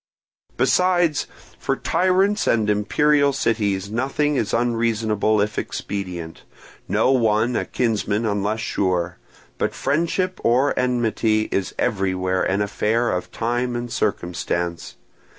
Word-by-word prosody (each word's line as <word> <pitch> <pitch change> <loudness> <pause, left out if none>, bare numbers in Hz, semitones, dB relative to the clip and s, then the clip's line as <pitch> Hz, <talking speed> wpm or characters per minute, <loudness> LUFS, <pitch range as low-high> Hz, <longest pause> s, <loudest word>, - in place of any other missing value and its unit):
"Besides, 175 -4 +2 0.3
for - - 0
tyrants 185 +4 +1
and 110 -2 +2
imperial 140 +7 +2
cities 105 -6 0
nothing 135 +5 0
is 110 -5 -1
unreasonable 115 -3 +1
if 105 +1 -1
expedient, 90 -5 -5 0.5
no 130 - +2
one 115 -1 +2
a - - 0
kinsman 110 -2 -1
unless 105 +1 -1
sure; 90 -5 -1 0.4
but - - -1
friendship 170 +6 0
or 130 +4 +3
enmity 115 -3 +1
is 95 - -2
everywhere 95 -2 0
an 100 +2 +1
affair 110 +3 0
of 90 - -3
time 120 +1 -1
and 120 0 -4
circumstance. 85 -1 -2
110 Hz, 115 wpm, -22 LUFS, 100-130 Hz, 0.5 s, or